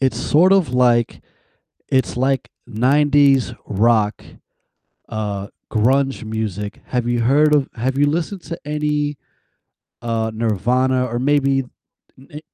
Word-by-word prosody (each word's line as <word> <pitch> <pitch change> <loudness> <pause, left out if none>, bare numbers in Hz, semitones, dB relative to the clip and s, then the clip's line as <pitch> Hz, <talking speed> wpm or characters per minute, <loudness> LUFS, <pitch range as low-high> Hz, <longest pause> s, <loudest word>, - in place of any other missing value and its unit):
It's 130 -4 0
sort 180 +6 +4
of 185 -10 +2
like 120 -2 +2 0.7
It's 130 -3 0
like 130 +2 0 0.2
'90s 140 +3 +3
rock, 105 0 +1 0.9
uh, 100 -2 -4 0.2
grunge 130 +4 +1
music. 105 -2 -5
Have 125 -2 -2
you 120 -1 0
heard 150 +5 +3
of 140 -2 0
Have 130 +3 -2
you 145 - +4
listened 170 +5 -2
to 165 +2 -7
any, 150 -1 -2 0.9
uh, 115 -1 -1
Nirvana 125 +4 0
or 120 0 -3
maybe 135 0 +1 0.5
ne 145 +3 -12
130 Hz, 120 wpm, -19 LUFS, 115-145 Hz, 0.9 s, sort